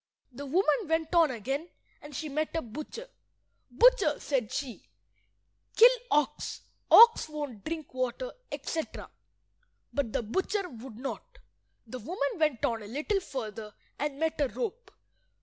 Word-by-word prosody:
The 280 +3 -8
woman 355 - +2
went 320 +1 0
on 335 -3 +5
again, 270 - -3 0.3
and 295 -1 -10
she 315 - -3
met 305 +3 -2
a 325 - +1
butcher. 305 - -8 0.6
"Butcher," - - +4
said 255 -7 -1
she, 275 -5 -5 0.9
"kill 475 +2 +9 0.2
ox. 295 0 0 0.3
Ox 460 -7 +8
won't 290 -9 -6
drink 315 -4 -5
water," 255 - -2 0.2
etc. 320 -1 -4 0.8
But 280 -6 -1
the - - -1
butcher 380 - -1
would 240 -4 -10
not. 390 - -7 0.5
The 250 +2 -7
woman 280 - -3
went 305 -7 +2
on 230 -2 -1
a 205 - -9
little 305 - -1
further, 220 - -6 0.2
and 290 -1 -2
met 320 -1 0
a 285 - +3
rope. 470 - -5
295 Hz, 140 wpm, -29 LUFS, 255-340 Hz, 0.9 s, kill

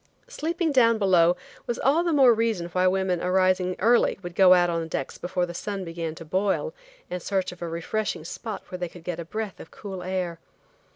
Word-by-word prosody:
Sleeping 340 -7 -1
down 230 -4 +4
below 180 -4 +4 0.3
was 240 - -1
all 300 +6 +3
the 345 - 0
more 270 -5 +6
reason 225 -6 0
why 185 +1 +2
women 185 -1 +1
arising 185 0 +2
early 235 +4 +3
would 175 0 -6
go 185 0 +7
on 175 -2 +2
the 165 - -5
decks 135 -4 -4
before 180 0 -1
the 175 - -8
sun 195 +1 -4
began 165 -1 -4
to 165 - -10
boil 195 - 0 0.4
in 180 - -2
search 190 +1 -1
of 180 - -13
a 170 - -3
refreshing 170 +1 -3
spot 215 +4 -6
where 180 - -6
they 175 -1 -3
could 175 0 -13
get 175 -1 -4
a 170 - -5
breath 215 +2 -5
of - - -11
cool 195 -3 -8
air. 180 -2 -3
185 Hz, 210 wpm, -25 LUFS, 175-215 Hz, 0.4 s, go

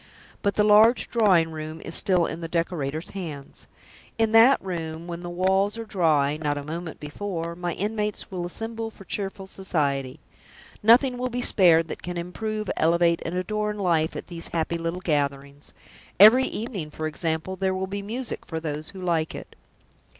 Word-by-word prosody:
But 200 -1 0
the 210 - +3
large 215 +3 +5
drawing 185 -8 +3
room 155 0 -6
is 165 - -4
still 180 -2 +4
in 165 +1 -5
the 165 - -4
decorator's 165 -2 -2
hands. 155 -8 -8 0.5
In 225 -1 +2
that 230 +5 +7
room 165 -3 -5
(when 170 0 -6
the 175 - -6
walls 190 +4 +1
are 230 - -5
dry 155 -8 +2
not 145 -2 -1
a 145 - -4
moment 160 +2 -6
before) 170 +2 -5
my 175 -1 -3
inmates 210 +2 -3
will 175 -2 -3
assemble 225 +4 -4
for 215 - -15
cheerful 195 0 -4
society. 145 -9 -2 0.6
Nothing 245 +3 +5
will 255 0 -1
be 245 0 -3
spared 165 -7 +5
that - - -6
can 175 0 -5
improve, 215 +5 -4
elevate, 170 +1 +3
and 165 - -4
adorn 210 +3 -2
life 170 -5 +1
at - - -6
these 170 -2 -7
happy 170 0 -2
little 165 +2 -3
gatherings. 140 -3 -2 0.5
Every 230 +6 +9
evening, 210 -9 -4
for 155 +1 -5
example, 160 +3 -2
there 190 0 -1
will 190 0 -2
be 200 +1 -5
music 230 +5 -5
for 160 - -4
those 155 -1 -5
who 195 - -10
like 165 -3 0
it." - - -10
175 Hz, 175 wpm, -25 LUFS, 160-210 Hz, 0.6 s, Every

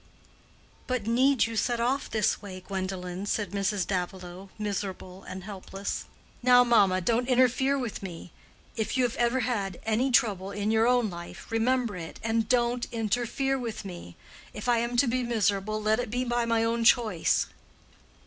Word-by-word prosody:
"But 255 -5 -1
need 255 +3 +3
you 225 0 -5
set 235 +2 0
off 255 +4 +1
in - - -20
this 215 -2 +1
way, 190 -3 -8
Gwendolen?" 185 0 -4
said 205 -3 -1
Mrs. 200 -1 0
Davilow, 185 0 -4
miserable 195 -3 -4
and 190 0 -7
helpless. 195 0 -5 0.4
"Now 245 0 +7
mamma, 200 -6 +4
don't 235 +6 +1
interfere 260 +2 +3
with 245 -5 -4
me. 175 -3 -8 0.4
If 225 +3 -2
you 255 - +3
have 240 -2 0
ever 240 +2 +2
had 205 -7 -2
any 225 +5 +1
trouble 205 -7 +2
in 205 +1 -1
your 225 +1 +3
own 245 -4 +2
life, 175 +4 -9
remember 230 -1 +1
it 165 -2 -8
and 225 0 0
don't 240 0 +1
interfere 240 +4 0
with 230 -4 -5
me. 175 - -8 0.4
If 210 - -6
I 240 -1 +4
am 235 +1 -1
to 265 - +5
be 255 +1 0
miserable, 215 -3 0
let 215 +2 +1
it 245 - -2
be 245 +3 -1
by 240 -1 0
my 230 -1 +2
own 230 +1 0
choice." 225 -7 +3
225 Hz, 170 wpm, -28 LUFS, 195-245 Hz, 0.4 s, Now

